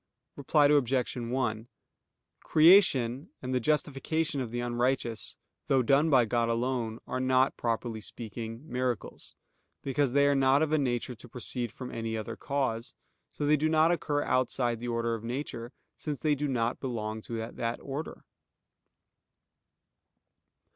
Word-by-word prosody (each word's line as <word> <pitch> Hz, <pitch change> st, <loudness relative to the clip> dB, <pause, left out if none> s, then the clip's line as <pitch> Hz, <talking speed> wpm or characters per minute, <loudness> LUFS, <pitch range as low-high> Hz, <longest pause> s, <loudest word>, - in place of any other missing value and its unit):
Reply 145 Hz, +1 st, +3 dB
Obj. 135 Hz, -3 st, +2 dB
1: 120 Hz, -2 st, -2 dB, 0.8 s
Creation, 155 Hz, -, +5 dB
and 130 Hz, 0 st, -4 dB
the 130 Hz, -, +2 dB
justification 150 Hz, +2 st, 0 dB
of 125 Hz, -, -4 dB
the 120 Hz, +2 st, -4 dB
unrighteous, 120 Hz, -1 st, -1 dB, 0.3 s
though 135 Hz, -2 st, +3 dB
done 140 Hz, +6 st, +4 dB
by 130 Hz, -5 st, +5 dB
God 115 Hz, +1 st, +1 dB
alone, 115 Hz, -1 st, -1 dB
are -, -, -3 dB
not, 130 Hz, +1 st, +3 dB
properly 115 Hz, -1 st, -2 dB
speaking, 115 Hz, +3 st, -7 dB
miracles, 125 Hz, -1 st, -3 dB, 0.5 s
because 135 Hz, -1 st, 0 dB
they 140 Hz, 0 st, +5 dB
are 145 Hz, -, +4 dB
not 135 Hz, +2 st, +4 dB
of 155 Hz, -, -1 dB
a 155 Hz, -, +3 dB
nature 125 Hz, -2 st, -1 dB
to 120 Hz, +1 st, -13 dB
proceed 120 Hz, 0 st, -4 dB
from 125 Hz, -1 st, -8 dB
any 115 Hz, -1 st, -3 dB
other 110 Hz, +1 st, -5 dB
cause; 125 Hz, -3 st, -2 dB, 0.4 s
so 145 Hz, -, -3 dB
they 150 Hz, +1 st, +5 dB
do 155 Hz, +2 st, +1 dB
not 160 Hz, +1 st, +4 dB
occur 145 Hz, -4 st, 0 dB
outside 120 Hz, -2 st, 0 dB
the 120 Hz, -, -5 dB
order 115 Hz, 0 st, 0 dB
of 115 Hz, -1 st, -5 dB
nature, 120 Hz, -1 st, -5 dB, 0.3 s
since 150 Hz, -4 st, -4 dB
they 150 Hz, +4 st, +2 dB
do 145 Hz, +1 st, -1 dB
not 120 Hz, -3 st, -1 dB
belong 110 Hz, -4 st, -4 dB
to 115 Hz, -, -9 dB, 0.2 s
that 115 Hz, 0 st, -3 dB
order. 140 Hz, +3 st, -6 dB
125 Hz, 145 wpm, -29 LUFS, 115-140 Hz, 0.8 s, Creation